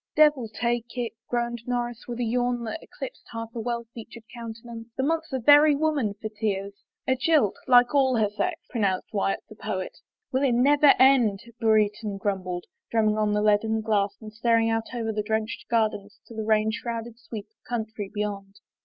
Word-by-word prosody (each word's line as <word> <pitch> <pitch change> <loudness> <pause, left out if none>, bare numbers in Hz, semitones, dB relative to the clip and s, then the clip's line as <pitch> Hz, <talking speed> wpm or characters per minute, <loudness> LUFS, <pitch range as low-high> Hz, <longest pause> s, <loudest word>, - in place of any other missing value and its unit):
" - - -67
Devil 295 -6 +5
take 235 +2 -2
it! 240 -2 -2
" - - -57
groaned 240 -1 -1
Norris, 240 -1 -2
with 240 -1 -4
a - - 0
yawn 245 +1 0
that 230 +8 -5
eclipsed - - -9
half 230 -1 -6
a 235 - -5
well 235 0 -3
featured 230 0 -10
countenance. 230 0 -8
*' - - -55
The 265 - 0
month's 320 +2 -1
a 265 - 0
very 290 +4 +6
woman 285 -9 0
for 220 - -4
tears! 205 -2 -3 0.2
" - - -53
"A 260 - +3
jilt 265 -6 +3
— - - -38
like 245 0 +6
all 265 -3 +4
her 215 -3 +2
sex," 330 - -2
pronounced 200 -6 -1
Wyatt, 195 -1 0
the - - -12
poet. 195 -3 -5 0.2
" - - -62
Will 260 - +1
it 270 -3 +3
never 285 +4 +5
have - - +7
done? 255 -6 +5
" 235 +1 -21
Brereton 215 -2 +2
grumbled, 185 -3 -3 0.2
drum 225 -1 +2
ming 215 0 0
on 210 -1 +2
the 210 0 +1
leaded 220 +1 +2
glass 205 -2 +1
and* 215 -1 -10
staring 230 0 +2
out 225 0 -2
over 225 -2 -1
the 210 - -1
drenched 220 +1 -2
gardens 215 -3 0
to - - -12
the 220 -1 -4
rain 215 0 +3
shrouded 230 0 -5
sweep 220 -3 -7
of - - -49
country 220 -4 -3
beyond. 200 -2 -4
225 Hz, 215 wpm, -26 LUFS, 215-245 Hz, 0.2 s, have